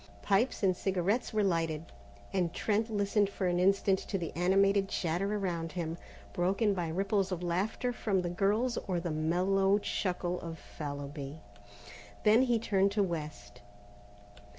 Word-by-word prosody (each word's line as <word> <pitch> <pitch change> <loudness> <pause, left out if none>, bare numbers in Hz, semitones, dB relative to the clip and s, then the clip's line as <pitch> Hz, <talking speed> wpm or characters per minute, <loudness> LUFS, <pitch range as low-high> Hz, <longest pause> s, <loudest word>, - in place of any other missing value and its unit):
Pipes 205 +4 +1
and 185 -2 +3
cigarettes 195 +5 0
were 215 -2 +1
lighted, 165 -3 -1 0.4
and 180 -3 +1
Trent 215 +4 0
listened 205 -1 +1
an 180 -2 +1
instant 195 +1 +3
to 195 - -3
the 170 -3 -5
animated 195 +3 +3
chatter 185 +5 -1
around 170 -5 -2
him, 165 -1 -3 0.4
broken 195 +4 +1
by 175 -3 -2
ripples 195 +3 0
of 180 -1 -3
laughter 200 +8 -1
from 195 -6 0
the 175 - -1
girls 210 +7 +1
or 180 -3 0
the 170 -1 -3
mellow 185 +5 +2
chuckle 180 -3 -2
of 165 -1 -6
Fallowby. 145 0 -7 0.8
Then 215 +3 +6
he 245 -3 +3
turned 200 -3 +2
to 205 -1 +2
West. 150 - -5
190 Hz, 145 wpm, -31 LUFS, 170-200 Hz, 0.8 s, Then